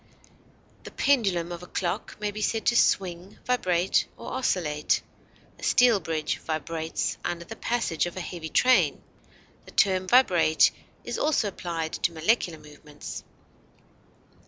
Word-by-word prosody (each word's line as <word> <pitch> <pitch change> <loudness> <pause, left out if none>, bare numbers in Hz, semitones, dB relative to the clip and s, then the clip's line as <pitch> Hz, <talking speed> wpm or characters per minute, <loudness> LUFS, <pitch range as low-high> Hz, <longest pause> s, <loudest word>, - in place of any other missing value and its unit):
The - - -8
pendulum 195 -11 +1
of 175 0 -6
a 180 - -10
clock 175 -2 -3
may 210 -1 -2
be 215 +1 -6
said 220 +1 -1
to 240 - +3
swing, 185 -4 +1
vibrate, 185 -7 +1
or - - -8
oscillate; 155 -12 0 0.6
a - - -14
steel 240 -4 +5
bridge 160 -3 -2
vibrates 160 0 -3
under 170 0 -3
the 225 - -8
passage 225 -9 -1
of 175 - -8
a - - -2
heavy 170 -3 -6
train; 255 +9 +3 0.6
the - - -14
term 185 -2 +2
vibrate 180 -10 +5 0.3
is - - -4
also 295 -9 +1
applied 165 -4 -4
to 170 - -1
molecular 170 0 +1
movements. 150 0 -10
175 Hz, 135 wpm, -26 LUFS, 165-215 Hz, 0.6 s, steel